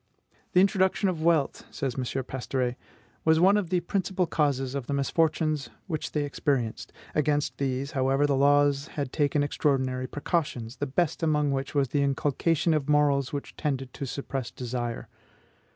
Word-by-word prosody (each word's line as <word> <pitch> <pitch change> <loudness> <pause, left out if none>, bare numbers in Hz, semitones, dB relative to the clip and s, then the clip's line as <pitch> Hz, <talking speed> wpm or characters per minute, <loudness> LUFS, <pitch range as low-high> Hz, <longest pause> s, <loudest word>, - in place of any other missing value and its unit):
"The 180 - +6
introduction 190 0 +2
of 170 -4 -3
wealth," 160 -4 +2
says 135 -4 -3
M. 130 - -3 0.2
Pastoret, 125 0 -2 0.5
"was 160 0 +4
one 190 +4 +6
of 205 -5 0
the 180 -1 +1
principal 185 0 0
causes 140 -5 0
of 140 -3 -4
the 140 - -1
misfortunes 155 +1 +1 0.2
which 160 -5 -4
they 150 - +1
experienced. 135 -5 -1 0.2
Against 150 -1 0
these, 135 +1 -1
however, 135 0 +2
the 145 -1 +2
laws 145 0 +3
had 140 -3 -2
taken 145 -1 +2
extraordinary 130 -3 0
precautions, 140 -6 -2
the 145 - -2
best 155 +4 0
among 150 -3 +2
which 135 +1 -3
was 140 -3 +2
the 145 +3 +1
inculcation 145 +4 +1
of 150 -2 -1
morals 145 -2 +3
which 140 -1 -5
tended 135 -4 -3
to 140 - -5
suppress 135 -1 -4
desire." 120 -1 -4
145 Hz, 160 wpm, -27 LUFS, 135-155 Hz, 0.5 s, The